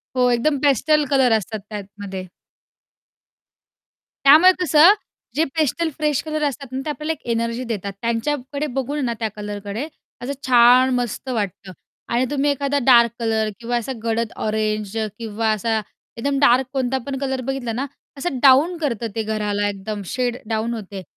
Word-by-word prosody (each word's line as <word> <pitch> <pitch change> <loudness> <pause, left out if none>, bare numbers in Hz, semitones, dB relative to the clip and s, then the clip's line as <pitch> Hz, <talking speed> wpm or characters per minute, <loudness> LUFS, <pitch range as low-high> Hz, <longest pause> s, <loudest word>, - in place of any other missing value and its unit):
हो, 250 -1 +3
एकदम 280 +5 +1
pastel 295 +2 +3
colour 265 -4 +3
असतात 215 +1 -5
त्यातमध्ये. 200 -2 -7 2.0
त्यामुळे 315 +7 +8
कसं 325 +3 +7 0.4
जे 315 - +3
पेस्टल 320 +2 +1
फ्रेश 300 -3 +1
कलर 310 -1 -3
असतात 275 0 -6
ना, 260 - -3
ते - - -3
आपल्याला 305 +2 -2
एक - - -14
एनर्जी 230 +2 -1
देतात. 205 -5 -4
त्यांच्याकडे 270 +5 -2
बघून 280 +2 -2
ना, 235 - -1
त्या 220 -2 -1
कलरकडे 205 +5 -5 0.3
असं 250 +3 -3 0.2
छान, 250 +1 +6
मस्त 245 +2 -3
वाटतं. 200 -4 -3 0.4
आणि 240 +2 +1
तुम्ही 290 0 +1
एखादा 280 0 -1
डार्क 235 -3 +6
कलर 220 -2 0
किंवा 240 +1 -1
असा 240 +3 -4
गडद 230 0 -1 0.2
ऑरेंज 215 -1 -1 0.2
किंवा 225 0 -2
असा 220 +1 0 0.4
एकदम 275 +4 -1
डार्क 260 -1 +5
कोणता 265 -1 0
पण 275 -1 -3
कलर 265 -1 -2
बघितला 270 -3 -2
ना, 260 +4 -2 0.3
असं 275 -2 -3
डाऊन 285 +6 +6
करतं. 235 -5 -1
ते 225 - -1
घराला 210 -1 -1
एकदम 205 +1 -5
शेड 250 -1 -1
डाऊन 225 +1 -1
होते 200 -3 -7
245 Hz, 155 wpm, -21 LUFS, 220-280 Hz, 2.0 s, त्यामुळे